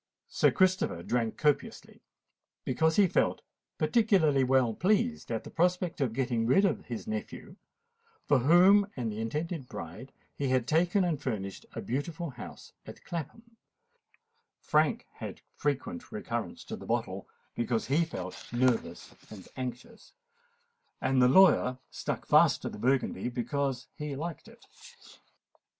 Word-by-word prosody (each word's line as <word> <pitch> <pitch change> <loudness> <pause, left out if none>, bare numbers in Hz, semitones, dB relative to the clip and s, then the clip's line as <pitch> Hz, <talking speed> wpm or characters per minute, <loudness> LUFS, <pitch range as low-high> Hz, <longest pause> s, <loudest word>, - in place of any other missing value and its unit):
Sir - - +3
Christopher 185 - +1
drank 115 0 -1
copiously, 150 -2 -1 0.6
because 160 +5 +1
he 205 - +6
felt 180 - +1 0.3
particularly 185 - +3
well 130 -3 +3
pleased 215 - 0
at 115 -2 -2
the - - -10
prospect 180 -1 0
of 130 -4 +1
getting 120 -2 -1
rid 195 +11 +4
of 185 - -1
his 115 -3 -6
nephew, 110 0 -6 0.7
for 145 - +4
whom 185 +9 +6
and 115 -3 -2
the 105 - -6
intended 150 +4 -3
bride 105 +11 -8 0.2
he 140 - -2
had 130 -2 +1
taken 175 +6 +2
and 165 -5 -1
furnished 100 -8 -4
a - - -5
beautiful 150 +5 -3
house 125 - -11
at - - -12
Clapham: 225 +8 -7 1.0
Frank - - +1
had - - -7
frequent 150 - -3
recurrence 120 - -4
to - - -6
the - - -11
bottle, - - -2 0.2
because 120 -1 -1
he 145 +6 +2
felt 95 - -7
nervous 125 0 0 0.2
and 100 -4 -11
anxious;—and 475 - -6
the 125 - +6
lawyer 135 -5 +5
stuck - - -4
fast - - +4
to - - -2
the - - -9
Burgundy, 130 +1 0
because 135 +2 -2
he 150 -2 -5
liked 165 +3 -6
it. - - -17
140 Hz, 135 wpm, -30 LUFS, 120-180 Hz, 1.0 s, he